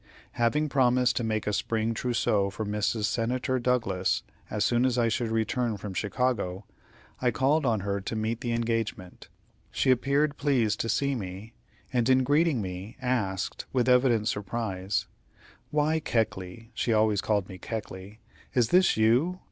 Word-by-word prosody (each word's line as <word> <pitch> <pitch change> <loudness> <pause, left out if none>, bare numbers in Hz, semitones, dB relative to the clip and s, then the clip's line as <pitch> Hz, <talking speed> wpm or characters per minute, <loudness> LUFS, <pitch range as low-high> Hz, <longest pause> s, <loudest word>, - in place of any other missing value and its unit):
Having 145 +6 +1
promised 125 -2 +3
to 120 - 0
make 110 -1 -1
a 105 - -1
spring 110 +2 0
trousseau 110 -4 +1
for 105 +3 -5
Mrs. 105 +1 -1
Senator 125 +4 0
Douglas 115 -7 0 0.3
as 105 -1 0
soon 120 0 +2
as 130 -1 +1
I 115 -1 +3
should 115 +1 -1
return 115 0 0
from 100 0 -6
Chicago, 100 -2 -1 0.6
I 125 - +3
called 135 +5 +2
on 110 -4 +1
her 100 0 -2
to 105 - -4
meet 110 +1 -2
the 120 - -2
engagement. 115 -5 -3 0.4
She 130 - +2
appeared 140 +4 +1
pleased 130 -7 +1
to 115 - -1
see 140 +5 +1
me, 100 -1 -6 0.4
and 120 0 +2
in 130 0 +5
greeting 145 -3 +2
me, 95 +4 -7
asked, 110 -7 -2
with 125 -2 +1
evident 125 -4 +4
surprise: 100 -2 -2 0.6
"Why, 150 +2 +1
Keckley" 110 -4 -2
she 115 - -1
always 110 -2 +3
called 105 -3 0
me 95 -2 -10
Keckley 105 -1 -7 0.3
"is 120 -3 +3
this 185 -6 +4
you? 125 +12 +3
115 Hz, 155 wpm, -28 LUFS, 105-125 Hz, 0.6 s, in